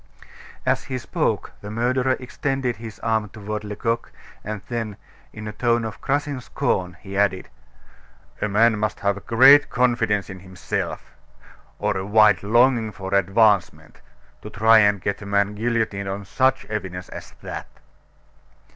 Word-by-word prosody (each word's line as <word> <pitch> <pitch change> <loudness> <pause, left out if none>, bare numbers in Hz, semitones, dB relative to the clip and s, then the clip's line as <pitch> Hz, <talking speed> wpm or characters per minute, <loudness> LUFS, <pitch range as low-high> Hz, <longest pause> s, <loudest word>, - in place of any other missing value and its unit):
As - - +1
he 130 - -3
spoke, 125 - -2
the 105 - -8
murderer 125 +4 0
extended 130 -1 -2
his 110 -1 -9
arm 110 -2 0
toward 105 +1 -6
Lecoq, 115 +3 -3 0.3
and 105 -1 -5
then, 115 -4 -4 0.3
in 110 0 -8
a - - -4
tone 115 +1 0
of 110 - -7
crushing 140 -1 -1
scorn, 90 -6 -2
he 100 -1 -8
added: 95 -2 +1 0.9
"A 105 - 0
man 110 +1 +3
must 110 0 -2
have 100 0 -1
great 135 +5 +7
confidence 120 -5 +1
in 95 -1 -9
himself, 95 -1 -5 0.6
or - - -1
a 95 - -3
wild 105 -2 +4
longing 120 +1 +3
for 95 0 -7
advancement, 100 0 +2 0.4
to - - -8
try 110 +2 +5
and 105 -1 +3
get 100 - -2
a - - -8
man 100 0 +1
guillotined 110 -3 -1
on 100 +1 -5
such 130 +5 +1
evidence 95 -4 -5
as - - -10
that!" - - -6
110 Hz, 145 wpm, -23 LUFS, 100-120 Hz, 0.9 s, great